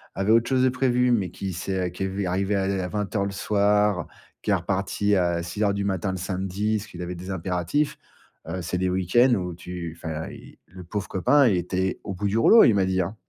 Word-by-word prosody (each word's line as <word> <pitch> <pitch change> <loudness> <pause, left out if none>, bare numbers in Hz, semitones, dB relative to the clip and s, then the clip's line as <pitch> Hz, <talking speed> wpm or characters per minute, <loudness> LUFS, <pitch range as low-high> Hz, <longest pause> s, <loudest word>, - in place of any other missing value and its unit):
avait 95 +3 +1
autre 115 +2 +4
chose 130 -1 +2
de 130 - +5
prévu, 125 -1 +2
mais 100 -6 +1
qui 95 -1 -5
s'est 90 +1 -2
qui 90 +2 -5
est - - 0
lui 95 +1 -3
arrivé 95 +3 0
à 95 - +1 0.2
à - - -3
20:00 105 0 -2
le - - -2
soir, 105 -1 +2
heu, - - -2 0.4
qui - - -5
est - - +4
reparti 100 +1 0
à 85 -2 +1
6:00 100 +3 -1
du 100 - -2
matin, 95 -1 -1
le 95 - -4
samedi, 95 +4 -2
parce 105 +2 -7
qu'il 85 - -9
avait 90 +1 -4
des 90 +2 -8
impératifs. 90 - -1 0.5
Heu, 90 +2 -4
c'est 90 +2 -2
des 95 0 +1
week-ends 95 +8 +3
où 90 -3 -3
tu 85 -1 -7
enfin, 80 -1 -5
il - - -13
le 95 0 -12
pauvre 95 +2 -4
copain, 130 +10 +3
il 100 - +3
était 95 +2 -1
au 100 - -5
bout 100 +3 -2
du 105 +3 0
rouleau, 225 - +7
il 115 - +5
m'a 100 -2 +2
dit, 95 0 0
hein, 95 +5 -4
95 Hz, 240 wpm, -25 LUFS, 90-105 Hz, 0.5 s, rouleau